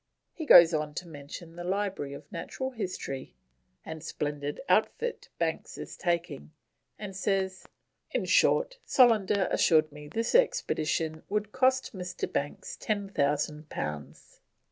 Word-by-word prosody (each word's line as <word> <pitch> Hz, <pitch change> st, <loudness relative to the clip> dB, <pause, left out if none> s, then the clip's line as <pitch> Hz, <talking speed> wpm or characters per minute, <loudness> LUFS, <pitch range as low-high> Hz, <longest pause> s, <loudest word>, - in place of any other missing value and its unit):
He 315 Hz, -3 st, -6 dB
goes 170 Hz, -7 st, +9 dB
on 150 Hz, -1 st, -2 dB
to 180 Hz, -, -5 dB
mention 160 Hz, +2 st, -9 dB
the 175 Hz, -, -6 dB
library 190 Hz, -6 st, -2 dB
of 140 Hz, -, -11 dB
Natural 240 Hz, +9 st, -4 dB
History 180 Hz, -, -5 dB, 0.5 s
and 160 Hz, -1 st, -7 dB
splendid 145 Hz, -2 st, -3 dB
outfit 480 Hz, 0 st, +1 dB
Banks -, -, -2 dB
is -, -, -7 dB
taking, 170 Hz, -, -2 dB, 0.5 s
and 205 Hz, -2 st, -7 dB
says, 190 Hz, -1 st, -1 dB, 0.4 s
"in -, -, -1 dB
short, -, -, +3 dB
Solander 210 Hz, -6 st, +4 dB
assured 155 Hz, -2 st, +4 dB
me 150 Hz, 0 st, -10 dB
this 230 Hz, +9 st, -2 dB
expedition 160 Hz, -, +1 dB
would 210 Hz, 0 st, -1 dB
cost 260 Hz, +1 st, +2 dB
Mr. 180 Hz, -1 st, -4 dB
Banks 145 Hz, +1 st, -3 dB
10,000 150 Hz, -7 st, -1 dB
pounds." 75 Hz, -2 st, -6 dB
175 Hz, 125 wpm, -29 LUFS, 150-205 Hz, 0.5 s, goes